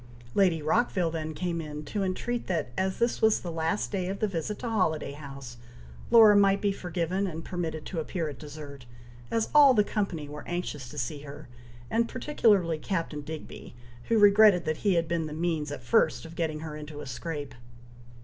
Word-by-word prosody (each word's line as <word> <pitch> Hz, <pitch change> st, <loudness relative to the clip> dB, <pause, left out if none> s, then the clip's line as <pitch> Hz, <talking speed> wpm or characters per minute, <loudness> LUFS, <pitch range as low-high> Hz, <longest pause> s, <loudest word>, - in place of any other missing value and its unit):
Lady 175 Hz, -6 st, +3 dB
Rockville 180 Hz, -1 st, +1 dB
then 160 Hz, -1 st, -4 dB
came 170 Hz, -1 st, -2 dB
in, 150 Hz, -1 st, -7 dB
to 205 Hz, -, -3 dB
entreat 235 Hz, +6 st, -2 dB
that, 165 Hz, -8 st, -1 dB
as 190 Hz, 0 st, -1 dB
this 235 Hz, 0 st, 0 dB
was 220 Hz, -1 st, +4 dB
the 175 Hz, -, -5 dB
last 165 Hz, +4 st, -1 dB
day 185 Hz, -3 st, -1 dB
of 195 Hz, +1 st, -3 dB
the 215 Hz, -, 0 dB
visit 195 Hz, +2 st, -3 dB
to 245 Hz, -, -5 dB
Holiday 185 Hz, -10 st, 0 dB
House, 140 Hz, -4 st, -9 dB, 0.5 s
Laura 225 Hz, -3 st, +8 dB
might 200 Hz, -1 st, +5 dB
be 205 Hz, -2 st, +1 dB
forgiven 180 Hz, +1 st, -2 dB
and 165 Hz, -2 st, -6 dB
permitted 165 Hz, -4 st, -4 dB
to 175 Hz, -, -4 dB
appear 165 Hz, +1 st, -3 dB
at 145 Hz, -3 st, -7 dB
dessert, 145 Hz, -4 st, -10 dB, 0.4 s
as 225 Hz, -1 st, 0 dB
all 285 Hz, -3 st, +8 dB
the 210 Hz, -, +5 dB
company 190 Hz, -8 st, -2 dB
were 150 Hz, +1 st, -8 dB
anxious 150 Hz, -7 st, -4 dB
to 150 Hz, -, -10 dB
see 140 Hz, +2 st, -3 dB
her, 140 Hz, -2 st, -10 dB, 0.4 s
and 230 Hz, +1 st, +1 dB
particularly 205 Hz, -, +2 dB
Captain 165 Hz, -3 st, -3 dB
Digby, 155 Hz, -4 st, -9 dB, 0.3 s
who 230 Hz, -, +2 dB
regretted 205 Hz, -3 st, +6 dB
that 155 Hz, 0 st, -1 dB
he 200 Hz, -4 st, +1 dB
had 165 Hz, -1 st, +1 dB
been 165 Hz, -1 st, -1 dB
the 150 Hz, -, -6 dB
means 160 Hz, -2 st, -1 dB
at 135 Hz, -4 st, -6 dB
first 120 Hz, +6 st, +2 dB
of 165 Hz, -, -10 dB
getting 160 Hz, -2 st, -2 dB
her 155 Hz, -1 st, -6 dB
into 150 Hz, -1 st, -8 dB
a -, -, -7 dB
scrape. 145 Hz, +3 st, -5 dB
165 Hz, 195 wpm, -28 LUFS, 150-200 Hz, 0.5 s, Laura